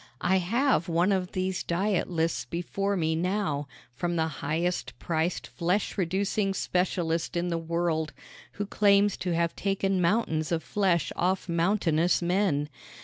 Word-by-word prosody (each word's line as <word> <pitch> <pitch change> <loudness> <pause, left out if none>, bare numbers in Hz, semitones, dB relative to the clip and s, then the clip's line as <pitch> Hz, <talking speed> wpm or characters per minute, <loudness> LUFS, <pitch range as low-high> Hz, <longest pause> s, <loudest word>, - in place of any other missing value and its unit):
I 190 - +3
have 225 - +1
one 170 +4 +2
of 185 -2 -1
these 185 0 -1
diet 190 +2 0
lists 165 -1 0
before 195 +4 -2
me 160 -2 +1
now 180 -4 -1 0.3
from 175 +7 -2
the 160 -1 +2 0.2
highest 170 +5 -1
priced 165 -4 -1
flesh 170 - -1
reducing 195 +2 0
specialist 175 -3 0
in 175 +1 0
the 170 -1 -1
world, 165 -1 -1 0.4
who 205 - -3
claims 200 -1 +3
to 180 -2 -1
have 170 0 0
taken 195 -1 0
mountains 170 -4 +1
of 165 -1 0
flesh 185 -6 +1
off 185 +2 0
mountainous 170 -1 +2
men. 175 -5 +1
175 Hz, 145 wpm, -28 LUFS, 165-195 Hz, 0.4 s, I